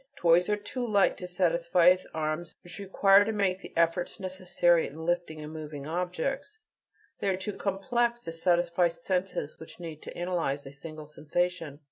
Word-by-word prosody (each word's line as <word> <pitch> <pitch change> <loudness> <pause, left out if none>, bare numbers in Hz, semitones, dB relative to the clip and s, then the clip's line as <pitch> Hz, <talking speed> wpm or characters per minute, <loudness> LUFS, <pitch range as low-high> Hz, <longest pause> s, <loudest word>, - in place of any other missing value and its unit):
Toys 175 -4 +4
are 210 - +2
too 210 +5 -5
light 205 -4 +3
to 180 - -6
satisfy 175 0 +4 0.2
arms 155 +1 -3
which 175 +3 -9
require 195 0 +5
to 220 - -1
make 195 -3 0
the - - -10
efforts 170 +3 +1
necessary 180 -3 +2
in 160 +3 -8
lifting 175 -2 -1
and 150 +1 -7
moving 150 -3 -7
objects; 180 - -3 0.6
they 200 - 0
are 185 - +1
too 190 +2 -4
complex 235 +5 0
to 165 - -6
satisfy 175 +1 +2
senses 170 -1 -3
which 160 - -12
need 160 -3 -7
to - - -9
analyze 170 -6 -1
a 135 - -8
single 155 +2 -9
sensation. 155 0 -2
175 Hz, 165 wpm, -29 LUFS, 160-190 Hz, 0.6 s, require